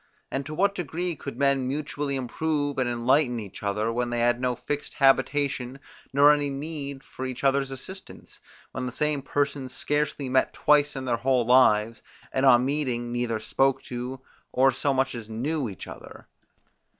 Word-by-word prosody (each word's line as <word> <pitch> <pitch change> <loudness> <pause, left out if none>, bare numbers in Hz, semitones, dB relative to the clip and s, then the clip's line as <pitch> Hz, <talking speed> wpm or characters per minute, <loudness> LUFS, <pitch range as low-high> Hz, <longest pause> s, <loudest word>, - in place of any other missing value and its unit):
And 135 +1 -3
to 155 - -6
what 200 +4 +2
degree 175 -1 -3
could 140 -1 -7
men 140 -2 +2
mutually 145 0 -3
improve 145 +2 -1
and 125 -2 +1
enlighten 120 +1 +2
each 100 -4 -9
other, 105 +3 -1
when 120 0 -1
they 120 - -2
had 120 +1 +2
no 125 -1 0
fixed 145 +4 -4
habitation, 135 -1 +2 0.3
nor 145 +2 +7
any 145 -1 +1
need 140 -1 -6 0.2
of 130 - -1
each 130 0 -6
other's 135 0 +2
assistance; 185 +9 -10 0.3
when 125 0 -4
the - - -4
same 150 +1 0
persons 140 -1 -2
scarcely 150 -1 -1
met 130 0 +2
twice 150 0 +3
in 135 -1 -4
their 120 -2 +1
whole 125 0 +2
lives, 115 -3 +4 0.3
and 135 +1 +3
on 125 -1 +6
meeting 130 -4 -1
neither 120 -2 -1
spoke 135 +4 +1
to, 125 +1 -5 0.3
or 135 +1 +4
so 135 +2 0
much 135 0 +1
as 115 -3 -7
knew 130 +4 -2
each 95 - -8
other? - - -11
135 Hz, 175 wpm, -26 LUFS, 125-145 Hz, 0.3 s, nor